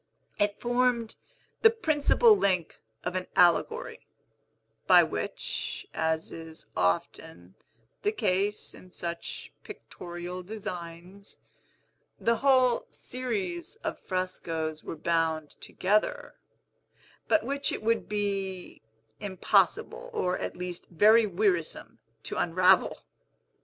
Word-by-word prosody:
It 205 0 +1
formed 245 -2 +1 0.5
the 450 - +8
principal 430 +2 +4
link 185 - 0 0.2
of 180 - -3
an 185 0 -2
allegory, 455 - +2 0.8
by - - +8
which - - -4
(as 160 0 -1
is 160 -1 -10
often 90 0 -2 0.5
the 420 - +1
case 205 - 0
in 185 - -14
such 170 -1 -6
pictorial 175 +1 -8
designs) 180 -1 -8 0.8
the 230 0 +2
whole 255 -3 +3
series 200 -9 -4
of - - -3
frescos 165 -4 -3
were - - -5
bound 160 -1 0
together, 210 +3 0 0.9
but 320 - +3
which 280 +2 -1
it - - -4
would 230 +1 +1
be 195 -3 -3 0.4
impossible, 205 - +1
or, 180 - 0
at - - -4
least, 180 -1 -6
very 215 +6 +5
wearisome, 180 - -1 0.2
to - - -5
unravel. 180 +2 +3
185 Hz, 100 wpm, -28 LUFS, 170-230 Hz, 0.9 s, the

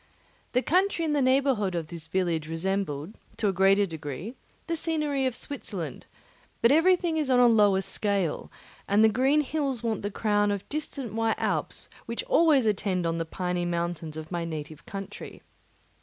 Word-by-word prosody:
The 250 +1 +2
country 365 0 +2
in 305 - 0
the 290 - +2
neighbourhood 260 -7 +2
of 165 -3 -3
this 165 -2 -8
village 165 -3 -1
resembled, 165 -1 -2 0.2
to 210 - +1
a - - -1
greater 195 +2 +4
degree, 160 - -6 0.3
the 335 - -1
scenery 300 -4 0
of 255 - -3
Switzerland; 285 - -6 0.6
but 230 - +6
everything 340 +1 +3
is 300 -3 0
on 250 -1 +4
a 245 - +7
lower 205 -5 +5
scale, 200 -4 -1 0.4
and 205 +2 +4
the 220 - +7
green 265 +7 +3
hills 280 -5 -2
want 225 -3 -1
the 205 - -2
crown 205 0 +1
of 200 -1 -3
distant 285 -5 -4
white 225 0 0
Alps - - -2 0.2
which - - -3
always 325 - +4
attend 195 -4 0
on 165 0 -1
the 165 - -1
piny 180 +1 -2
mountains 170 -2 -3
of 155 +1 -8
my 175 -1 -2
native 155 -2 -7
country. 195 -1 -8
205 Hz, 170 wpm, -27 LUFS, 175-270 Hz, 0.6 s, a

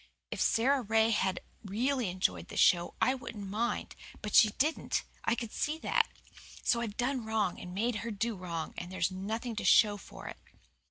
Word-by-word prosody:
If - - -3
Sara 265 +4 +3
Ray 220 0 +3
had 190 -4 +1 0.2
really 235 +3 0
enjoyed 90 - -1
the - - -8
show 175 -1 +4
I 255 - +3
wouldn't 220 -6 -7
mind. 225 +5 -2 0.3
But 210 - -4
she 215 - +8
didn't. 295 +9 0 0.2
I 230 - +3
could 230 -3 -5
see 305 +1 -1
that. - - +2 0.6
So 235 - +2
I've 215 -3 -4
done 250 0 0
wrong 220 -4 0
and 180 - -8
made 225 +2 0
her 235 - -4
do 225 +1 -2
wrong 170 -4 -5
and 175 +1 -7
there's 185 -1 0
nothing 220 +5 -4
to - - -2
show 210 -2 +5
for - - -11
it." - - -7
220 Hz, 185 wpm, -31 LUFS, 190-235 Hz, 0.6 s, she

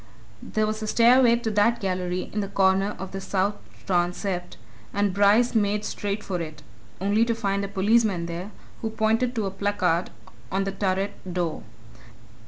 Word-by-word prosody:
There 215 0 -1
was 215 +1 -3
a 215 - -3
stairway 235 +2 +5
to 235 -2 -2
that 210 +3 +3
gallery 185 -1 -2
in 210 - -1
the 200 - -1
corner 195 +1 +2
of 190 0 -7
the 195 - -5
south 195 +1 0 0.3
transept, 180 0 -1 0.4
and 200 -1 +1
Bryce 205 +5 +4
made 210 -1 +1
straight 205 +1 -3
for 180 -3 -3
it 155 -2 -7 0.4
only 205 +4 +2
to 230 0 0
find 200 -3 -1
a - - -2
policeman 200 -2 +2
there, 170 +3 -5 0.3
who 225 - -1
pointed 225 +3 +1
to 220 -3 0
a 195 - -2
placard 190 -3 0 0.4
on 195 +1 +1
the 195 - -2
turret 195 0 -1 0.2
door. 175 -3 -2
200 Hz, 170 wpm, -25 LUFS, 185-215 Hz, 0.4 s, stairway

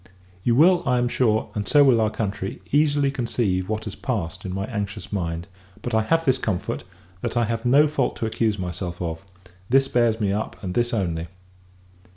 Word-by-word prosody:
You 120 - +3
will, 175 +6 +6
I 125 - +3
am 120 0 +2
sure, 110 -3 +1
and 105 -1 -3
so 145 -1 +6
will 125 -5 +5
our 110 - +2
country, 100 -3 -4
easily 145 -1 +3
conceive 115 -8 -1
what 110 0 -2
has 105 - -6
passed 95 -8 -4
in 95 - -3
my 95 +1 -2
anxious 105 -2 -5
mind; 85 -3 -2 0.4
but 120 - -3
I 110 - +4
have 165 +9 +1
this 130 -2 +3
comfort, 95 -8 -2 0.4
that 120 0 -2
I 120 - +3
have 115 +1 -3
no 145 +5 +6
fault 145 -3 0
to - - -3
accuse 110 -1 0
myself 90 -1 -4
of: 85 0 -4 0.5
this 135 +2 +4
bears 120 -3 +2
me 100 -3 +1
up, 105 +2 -3
and 90 -2 -3
this 120 +2 +1
only. 85 -6 -1
110 Hz, 195 wpm, -24 LUFS, 95-125 Hz, 0.5 s, will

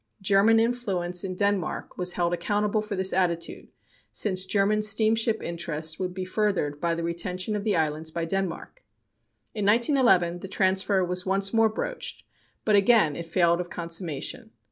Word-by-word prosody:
German 205 +3 +4
influence 195 -7 -1
in 185 -1 -4
Denmark 200 -3 -1
was 180 -1 0
held 175 -1 0
accountable 210 +3 0
for 210 -1 -5
this 190 0 +1
attitude, 170 -2 -1 0.4
since 190 -2 0
German 205 +2 +2
steamship 220 +2 +2
interests 160 -2 -3
would 185 -1 -2
be 185 0 -5
furthered 185 -8 -1
by 170 -1 +1
the 170 - -4
retention 180 +4 -3
of 205 - -3
the 210 -2 +1
islands 160 0 -1
by 165 +1 -3
Denmark. 195 - -4 0.7
In 210 -3 -3
1911, 210 - +3
the 195 - -7
transfer 190 0 +1
was 180 +1 -3
once 195 +1 0
more 225 -1 +4
broached, - - -5 0.4
but 215 - +4
again 200 -7 +4
it 170 +2 -6
failed 170 0 +2
of 175 - -8
consummation. 170 - -4
190 Hz, 160 wpm, -26 LUFS, 170-210 Hz, 0.7 s, German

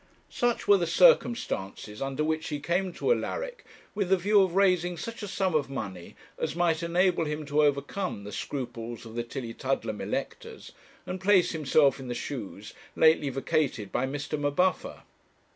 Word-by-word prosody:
Such 240 -1 0
were 205 - +7
the 170 - 0
circumstances 160 - +2
under 135 +2 -1
which 155 0 -1
he 145 - -3
came 180 +5 -1
to 465 - 0
Alaric - - -4 0.3
with 200 -3 -1
the 190 - +5
view 200 +3 +4
of 185 -2 +1
raising 180 -3 +2
such 230 +8 -6
a 205 - -4
sum 190 -2 -1
of 145 -3 +1
money 95 -10 -6 0.2
as - - -2
might 170 -2 +1
enable 170 0 +2
him 150 0 -4
to 145 +1 +2
overcome 145 - -1
the 105 - -8
scruples 120 -2 -5
of 110 - -10
the 120 0 -2
Tillietudlem 115 -2 -3
electors, - - -5 0.3
and 185 +1 -5
place 190 -2 +4
himself 145 -3 +3
in 130 - -8
the 120 - -3
shoes 115 -5 -6 0.2
lately 160 -3 +4
vacated 135 -6 -1
by 130 - 0
Mr. 145 +2 -4
M'Buffer. 145 +6 0
155 Hz, 165 wpm, -28 LUFS, 130-185 Hz, 0.3 s, were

